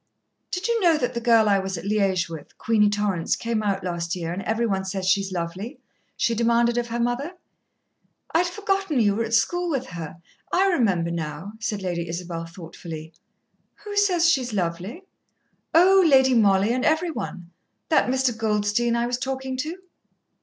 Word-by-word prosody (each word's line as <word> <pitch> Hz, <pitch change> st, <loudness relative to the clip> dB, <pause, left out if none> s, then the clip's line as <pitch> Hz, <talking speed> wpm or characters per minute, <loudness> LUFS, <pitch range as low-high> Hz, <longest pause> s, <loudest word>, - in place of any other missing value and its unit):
"Did 360 Hz, +4 st, -2 dB
you 470 Hz, -1 st, +1 dB
know 335 Hz, -4 st, +4 dB
that 245 Hz, -5 st, -1 dB
the 235 Hz, -, -3 dB
girl 230 Hz, -2 st, +4 dB
I 200 Hz, -1 st, +4 dB
was 190 Hz, -1 st, -3 dB
at 165 Hz, -, -8 dB
Liège 195 Hz, -4 st, +1 dB
with, 165 Hz, -2 st, -10 dB
Queenie 215 Hz, -2 st, +3 dB
Torrance, 205 Hz, -5 st, 0 dB
came 230 Hz, -1 st, -2 dB
out 195 Hz, -2 st, -1 dB
last 170 Hz, -1 st, -3 dB
year, 170 Hz, -1 st, -4 dB
and 185 Hz, -, -4 dB
every 225 Hz, +3 st, 0 dB
one 195 Hz, -3 st, -1 dB
says 190 Hz, 0 st, -4 dB
she's 195 Hz, +1 st, +2 dB
lovely?" 185 Hz, -, -5 dB, 0.4 s
she 235 Hz, -, +1 dB
demanded 235 Hz, +1 st, +2 dB
of 240 Hz, -, -3 dB
her 235 Hz, 0 st, -3 dB
mother. 245 Hz, +8 st, -1 dB, 1.0 s
"I'd 350 Hz, +2 st, +3 dB
forgotten 390 Hz, -, -1 dB
you 205 Hz, -3 st, +3 dB
were 225 Hz, +3 st, -1 dB
at 225 Hz, 0 st, 0 dB
school 350 Hz, +10 st, +1 dB
with 270 Hz, -5 st, -1 dB
her. 165 Hz, -2 st, -7 dB, 0.3 s
I 375 Hz, +2 st, +3 dB
remember 195 Hz, -, +1 dB
now," 165 Hz, +3 st, -5 dB
said 210 Hz, -3 st, -3 dB
Lady 175 Hz, -2 st, -3 dB
Isabel 170 Hz, -1 st, -5 dB
thoughtfully. 165 Hz, -2 st, -9 dB, 0.7 s
"Who 415 Hz, -1 st, -6 dB
says 370 Hz, -5 st, +3 dB
she 310 Hz, -6 st, +4 dB
is 245 Hz, -2 st, -5 dB
lovely?" 185 Hz, -, -3 dB, 0.7 s
"Oh, 375 Hz, +3 st, +6 dB
Lady 265 Hz, -5 st, +5 dB
Mollie 205 Hz, -1 st, +4 dB
and 255 Hz, +1 st, -1 dB
every 320 Hz, +2 st, +2 dB
one. 175 Hz, -, -6 dB, 0.4 s
That 315 Hz, -, +3 dB
Mr. 260 Hz, -2 st, +1 dB
Goldstein 220 Hz, +2 st, +1 dB
I 235 Hz, 0 st, +1 dB
was 245 Hz, 0 st, -2 dB
talking 265 Hz, 0 st, -3 dB
to." 315 Hz, +7 st, -4 dB
225 Hz, 180 wpm, -24 LUFS, 185-265 Hz, 1.0 s, Oh